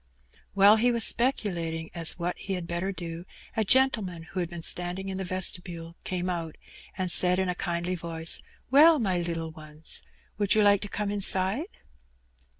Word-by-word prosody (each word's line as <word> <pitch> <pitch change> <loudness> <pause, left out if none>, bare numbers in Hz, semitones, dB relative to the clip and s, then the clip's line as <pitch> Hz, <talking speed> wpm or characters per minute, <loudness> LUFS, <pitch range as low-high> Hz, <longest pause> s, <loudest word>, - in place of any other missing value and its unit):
While 200 +2 +6
he 245 +3 +2
was 235 -1 +3
speculating 170 -10 0
as 170 -2 +2
to - - -21
what 175 0 -3
he 195 - -5
had 180 -2 -4
better 170 +3 -3
do, 170 -2 -7 0.3
k 220 - +1
gentleman 210 -8 +1
who 175 +3 -7
had 175 -2 -2
been 170 -2 -9
standing 180 +3 +1
in 190 0 -5
the - - -3
vestibule 175 -2 -3
came 180 -1 -3
mt, 170 -3 -4 0.4
and 185 -2 -1
said 180 +1 +6
in 190 -1 -1
a - - 0
kindly 175 0 -3
voice, 165 -1 -3
*' - - -36
Well, 310 +4 +7
my 190 -8 -1
little 165 -1 -4
ones, 155 0 -5 0.4
would 205 0 +2
rou 215 - +4
like 205 -1 +4
to 205 - -5
come 205 0 -3
inside?' 200 - +2
180 Hz, 185 wpm, -27 LUFS, 170-200 Hz, 0.4 s, Well